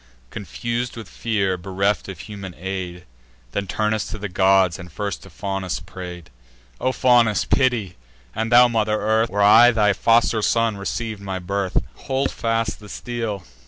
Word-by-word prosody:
Confus'd 120 +3 -4
with 115 - -8
fear, 100 -5 -1
bereft 95 +3 -1
of 95 -2 -7
human 100 -3 -8
aid, 90 -1 -5 0.5
Then 100 -1 -3
Turnus 110 +3 -1
to - - -6
the 105 0 -4
gods, 95 -1 +3
and 90 -2 -10
first 100 +3 -4
to 95 - -13
Faunus 95 -2 -3
pray'd: 90 -2 -9 0.5
"O 130 - +1
Faunus, 120 -4 +3
pity! 120 -8 +1 0.4
and 115 +1 -2
thou 120 +1 +8
Mother 110 -2 0
Earth, 110 +2 +2
Where 100 +1 +1
I 110 +4 +8
thy 105 -3 +3
foster 115 +2 +3
son 115 0 +2
receiv'd 100 +2 -4
my 95 -1 -4
birth, 95 +1 -2 0.2
Hold 135 +1 -2
fast 115 -1 -1
the 105 -1 -13
steel! 115 -6 -4
105 Hz, 160 wpm, -22 LUFS, 95-115 Hz, 0.5 s, thou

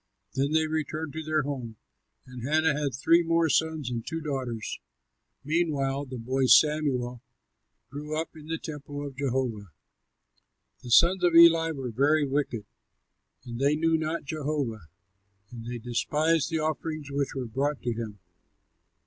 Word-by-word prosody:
Then 140 +3 0
they 160 0 +3
returned 155 0 -3
to 160 - -4
their 155 -1 0
home; 130 -5 -5 0.5
and 125 -1 -10
Hannah 155 +4 +2
had 145 -3 -2
three 165 +6 +4
more 165 -1 +2
sons 160 -4 0
and 115 -2 -3
two 165 +5 -4
daughters. 130 -7 -4 0.6
Meantime 145 -3 0
the 130 - -6
boy 130 +3 0
Samuel 130 -6 +3 0.7
grew 150 +2 -4
up 165 0 -5
in 155 -1 -12
the 165 +1 -2
temple 145 -2 -7
of 140 -2 -7
Jehovah. 125 -7 -2 1.1
The 125 - -9
sons 175 +9 +5
of 175 -2 +3
Eli 165 -1 +7
were 135 -6 -4
very 145 +6 +3
wicked. 135 -6 -2 0.8
They 135 +5 +1
knew 165 +1 +2
not 160 +1 -2
Jehovah, 140 - -3 0.6
and 115 -1 -9
they 120 0 -4
despised 150 +7 0
the 165 - -1
offerings 155 -1 -3
which 140 -1 -2
were 130 -2 -3
brought 135 +5 -2
to 120 - 0
him. 110 -2 -6
145 Hz, 150 wpm, -27 LUFS, 125-155 Hz, 1.1 s, Eli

